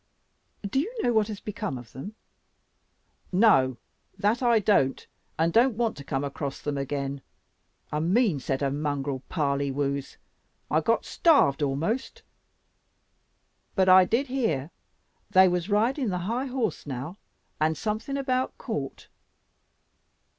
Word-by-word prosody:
"Do 265 - 0
you 360 +11 -1
know 240 - +2
what 215 -2 +3
has 210 -2 -6
become 210 - -4
of 120 -2 -12
them?" 195 - -8 1.2
"No 135 - +4 0.4
that 210 +5 +1
I 240 -2 +4
don't, 190 -11 +2 0.3
and 165 +1 +1
don't 235 -1 +4
want 235 -2 0
to 140 - -8
come 135 0 -2
across 140 0 -4
them 145 -1 -3
again. 140 0 -3 0.7
A 150 - -1
mean 185 - +2
set 135 +1 -2
of 135 -1 0
mongrel 145 -2 -2
parlywoos; 140 -2 -1 0.5
I - - +3
got - - +1
starved 280 - +3
amost. 160 - -2 1.5
But 190 -2 +3
I 185 0 +8
did 235 +8 +1
hear 175 - -1 0.6
they 190 0 +6
was 180 +1 -1
riding 230 +5 +1
the 180 - -1
high 245 +6 -1
horse 250 - -2
now, 140 +7 -5 0.4
and 155 +1 +1
something 220 +6 -3
about 260 -2 -1
court." 145 - -5
180 Hz, 130 wpm, -27 LUFS, 140-230 Hz, 1.5 s, I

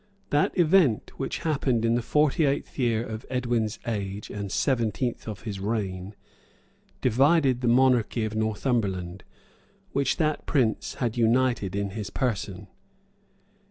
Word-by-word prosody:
[] 195 - -39
That 145 +6 +2
event, 165 - +3
which 135 - -2
happened 135 -7 +1
in 115 - +3
the 120 - +1
forty 150 +5 +2
eighth 140 0 -1
year 115 -2 +1
of 110 -1 -6
Edwin's 120 -4 -1
age 100 -3 -4
and 100 -2 -5
seventeenth 120 -1 0
of 105 -3 -6
his 105 -4 -5
reign,[] 100 -2 -3 0.9
divided 135 +1 +3
the 125 - 0
monarchy 120 -2 +3
of 110 0 -4
Northumberland, 105 -5 -1 0.7
which 140 -2 0
that 155 -3 -1
prince 125 -8 0
had 120 -2 -2
united 120 -4 +2
in 100 -1 -2
his 105 -1 -5
person. 100 -4 -3
115 Hz, 135 wpm, -26 LUFS, 105-130 Hz, 0.9 s, event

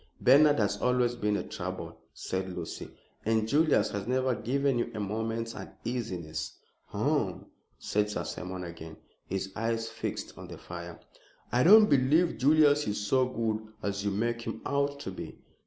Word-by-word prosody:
"Bernard 145 +1 +6
has 100 -1 +1
always 125 -1 +2
been 105 -3 0
a - - -3
trouble," - - -6 0.2
said 95 -1 -4
Lucy, 85 -2 -6 0.3
"and 110 0 +1
Julius 150 +5 +3
has 100 0 -4
never 130 0 +1
given 135 +3 0
you - - -1
a - - -3
moment's 115 +3 -2
uneasiness." 90 - -5 0.3
"Hum," - - -1 0.3
said 105 0 0
Sir 105 - -3
Simon 90 0 -5
again, 80 -2 -9 0.3
his 95 0 -3
eyes 115 0 -1
fixed 110 0 -5
on - - -8
the - - -9
fire. - - -8 0.5
"I 125 - +3
don't 210 +7 +8
believe 140 - +3
Julius 150 +1 +5
is 105 0 -1
so 125 +5 +2
good 110 -3 -1 0.2
as 100 0 -2
you 105 - +1
make 115 +4 -1
him - - -5
out 140 0 0
to 95 - -5
be. 95 - -8
115 Hz, 160 wpm, -29 LUFS, 100-130 Hz, 0.5 s, don't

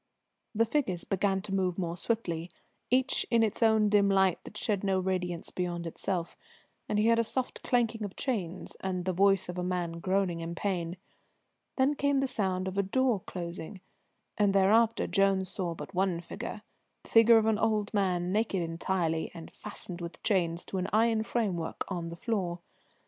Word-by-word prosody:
The 225 +2 +4
figures 225 - 0
began 195 0 0
to 195 - -5
move 185 -2 0
more 170 -3 -2
swiftly, 175 -4 -2 0.4
each 260 +2 +3
in 230 -1 +4
its 220 +1 -1
own 220 -2 +4
dim 205 -1 +4
light 190 -2 +3
that 210 - -8
shed 210 -2 0
no 190 -1 +2
radiance 180 -2 -2
beyond 175 -1 -3
itself, 170 +1 -3 0.5
and 210 - +1
he 210 +2 +3
heard 230 0 +4
a - - +4
soft 255 +3 -3
clanking 230 -3 +1
of 200 -2 -5
chains 195 -10 -3
and 185 -2 -3
the 185 - 0
voice 195 +1 +3
of 180 0 -5
a - - -1
man 175 -2 -2
groaning 185 -1 0
in 165 +1 -5
pain. 180 -3 -2 0.8
Then 265 +2 +3
came 285 -1 +1
the 270 - +1
sound 190 -6 -1
of 190 +1 -2
a - - +6
door 240 +3 +1
closing, 175 +2 -6 0.6
and 200 -1 +3
thereafter 220 +4 +4
Jones 195 -2 +2
saw 180 -3 -3
but - - -8
one 185 -2 +1
figure, 170 - -7 0.4
the - - -15
figure 230 0 +7
of 220 - +3
an 220 -1 +2
old 215 -2 +1
man, 180 -3 +1
naked 205 -3 +1
entirely, 165 -1 -1
and 165 -1 -9
fastened 185 -4 -6
with 170 0 -8
chains 175 -5 +1
to 190 - -3
an 185 - -1
iron 225 +1 +3
framework 200 -8 -2
on 175 -3 -3
the 170 - -6
floor. 185 -5 -1
190 Hz, 180 wpm, -30 LUFS, 175-220 Hz, 0.8 s, figure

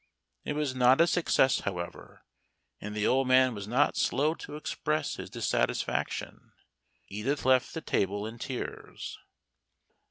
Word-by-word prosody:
It - - -2
was 150 -3 -1
not 130 +1 +5
a 170 - +7
success, 165 -6 +3
however, 90 -3 -6 0.6
and 105 +1 -6
the 105 0 0
old 130 0 +3
man 130 -1 +5
was 100 -2 -6
not 130 +6 +2
slow 150 +3 +2
to 150 - -9
express 155 0 -2
his 95 0 -7
dissatisfaction. 115 +1 -2 0.5
Edith 125 +9 -2
left 130 +2 +3
the 160 - -3
table 100 -3 0
in 115 +2 -7
tears. 130 +1 -6
130 Hz, 135 wpm, -29 LUFS, 105-145 Hz, 0.6 s, a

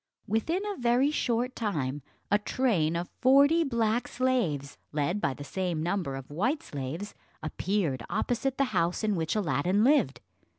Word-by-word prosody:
Within 320 - 0
a 410 -2 -3
very 245 +4 +3
short 250 -3 0
time, 145 - -2 0.3
a 205 - +5
train 205 -9 +1
of 170 +1 -2
forty 280 +6 +6
black 235 -4 0
slaves, 190 - -1
led 155 +7 -1
by 135 - 0
the 145 - -8
same 175 +1 -2
number 175 -6 -1
of 135 +1 -8
white 255 - 0
slaves, 145 +9 -5 0.3
appeared 160 - -1
opposite 260 +2 -1
the 275 - +3
house 175 +2 +1
in 210 -2 +1
which 160 +1 -1
Aladdin 190 0 +1
lived. 260 - +3
205 Hz, 155 wpm, -29 LUFS, 155-250 Hz, 0.3 s, forty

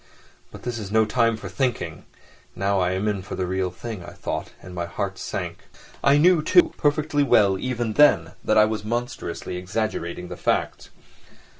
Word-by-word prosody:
"But - - -12
this 120 -2 -3
is 100 -2 -6
no 110 0 +4
time 115 0 +2
for 100 - -8
thinking: 95 - -2 0.5
now 100 +1 +1
I 90 0 +1
am 95 +3 -1
in 105 -2 -1
for 100 - -7
the 95 - -1
real 95 0 -1
thing," 100 +1 -7
I - - -10
thought, - - -4
and 90 - -11
my 85 -1 -3
heart 95 +2 -4
sank. - - -4 0.4
I 140 +1 +5
knew, 170 +2 +5
too, 330 - +4
perfectly 150 0 +1
well 100 -8 +4
even 120 -3 -2
then, 85 - +5
that 110 - +2
I 105 - +7
was 110 -1 -3
monstrously 120 -4 -4
exaggerating 90 -2 -3
the - - -7
facts. - - -1
105 Hz, 180 wpm, -24 LUFS, 95-120 Hz, 0.5 s, I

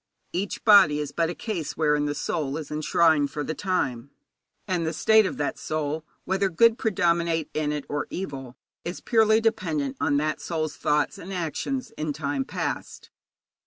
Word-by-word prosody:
Each 190 +3 -3
body 200 -9 +7
is 145 -1 -3
but 165 +1 0
a 175 - -4
case 185 -9 -4
wherein 150 -2 +2
the 145 0 -2
soul 145 -3 -2
is 155 - -7
enshrined 155 -1 +3
for 150 +1 -4
the 155 - -3
time. 140 - -2 0.6
And 180 -3 0
the 160 0 -1
state 220 +4 +5
of - - -5
that 145 - -2
soul, 155 0 -2 0.2
whether 195 +1 +1
good 230 +7 +4
predominate 170 -6 +1
in 155 -1 0
it 150 -2 -3
or 145 0 -2
evil, 135 -8 -6 0.3
is 175 - -5
purely 220 -2 +4
dependent 160 -11 -1
on 145 - +2
that 155 +1 -1
soul's 155 -3 -2
thoughts 150 0 0
and 185 - -8
actions 190 - -3
in 155 -1 -1
time 140 -2 -2
past. - - -5
160 Hz, 170 wpm, -26 LUFS, 145-185 Hz, 0.6 s, body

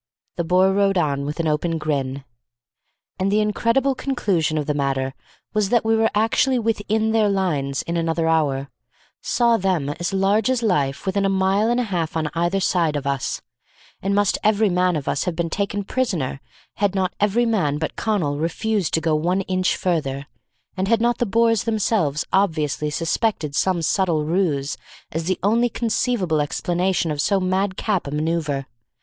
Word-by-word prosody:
The 170 - -1
Boer 185 +3 +3
rode 195 -1 +2
on 140 -4 0
with 150 +2 -5
an 165 - 0
open 160 +2 0
grin. 140 -3 -2 1.0
And 190 +1 +1
the 210 - +3
incredible 230 +6 +1
conclusion 195 - -1
of 150 - -1
the 150 - 0
matter 135 -2 -1 0.4
was 210 -2 +1
that 235 -1 +2
we 225 0 +3
were 225 0 +3
actually 225 +4 +2
within 220 -1 0
their 220 -2 +3
lines 150 -8 -1
in 170 0 -3
another 165 0 0
hour; 140 -4 +1 0.5
saw 235 -1 +2
them 185 -8 0
as 175 +5 -3
large 195 +4 +2
as 255 -2 0
life 145 -10 0
within 195 +1 0
a 195 - +2
mile 195 +3 +2
and 240 +1 +2
a - - +1
half 170 -7 -2
on 155 -2 -2
either 175 +4 0
side 170 -5 +1
of 145 -1 -3
us; 140 -2 -2 0.6
and 200 +1 0
must 205 -1 +2
every 215 0 +3
man 180 -1 +2
of 145 -3 -4
us - - 0
have 180 -3 -2
been 165 -1 -2
taken 200 +1 -2
prisoner 190 - -2 0.4
had 200 -1 +1
not 190 -1 0
every 210 +4 +2
man 185 -11 +1
but 160 - -3
Connal 165 -10 -1
refused 190 +4 -1
to 160 - 0
go 160 0 +1
one 175 +5 +1
inch 185 -1 0
further, 140 -6 -1 0.5
and 190 0 -1
had 230 +1 +3
not 235 +1 +1
the 240 - +1
Boers 230 +1 +2
themselves 205 -9 0
obviously 155 -6 +1
suspected 165 0 -1
some 180 -1 +1
subtle 165 -3 +1
ruse 155 -5 0 0.3
as 160 +1 -3
the 185 +1 0
only 230 +4 +3
conceivable 220 - 0
explanation 175 +3 0
of 145 -1 -1
so 200 +5 +2
madcap 190 0 -1
a - - -5
manoeuvre. 150 -2 -1
185 Hz, 180 wpm, -22 LUFS, 155-210 Hz, 1.0 s, Boer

